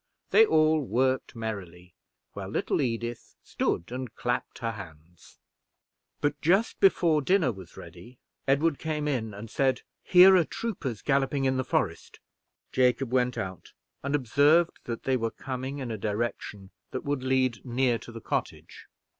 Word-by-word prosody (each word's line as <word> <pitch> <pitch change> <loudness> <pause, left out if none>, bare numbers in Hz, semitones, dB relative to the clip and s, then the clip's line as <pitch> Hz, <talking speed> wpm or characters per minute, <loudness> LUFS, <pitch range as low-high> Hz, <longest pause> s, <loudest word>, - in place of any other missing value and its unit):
They 450 0 +7
all 155 - +3
worked 130 +2 0
merrily, 90 -6 -6 0.4
while - - -6
little - - 0
Edith 120 -2 -3
stood 85 - -2
and 125 -2 -5
clapped 120 0 -2
her 115 -1 -2
hands. 85 -5 -13 0.8
But 145 0 -1
just 195 +8 +2
before 170 -5 +4
dinner 175 -3 +2
was 95 -5 -12
ready, 125 +1 -12 0.3
Edward 145 +3 +2
came 155 -2 -2
in 120 -7 -1
and 105 +3 -8
said, 130 +3 0 0.2
"Here 185 +1 +8
are 180 - +5
troopers 155 - -5
galloping 135 0 +1
in 130 0 +1
the 130 - 0
forest!" 125 - -2 0.5
Jacob 125 0 +2
went 125 -1 +1
out, 95 -2 -6 0.3
and 140 +1 -1
observed 145 +6 +3
that 115 -1 -5
they 130 -1 +1
were 115 -1 -1
coming 130 +3 -5
in 130 -4 -5
a 110 - -4
direction 105 -2 -4 0.2
that 130 - -5
would 145 -2 -1
lead 130 -2 0
near 125 -1 +1
to 120 - -11
the 115 -1 -9
cottage. - - -4
130 Hz, 155 wpm, -27 LUFS, 115-145 Hz, 0.8 s, Here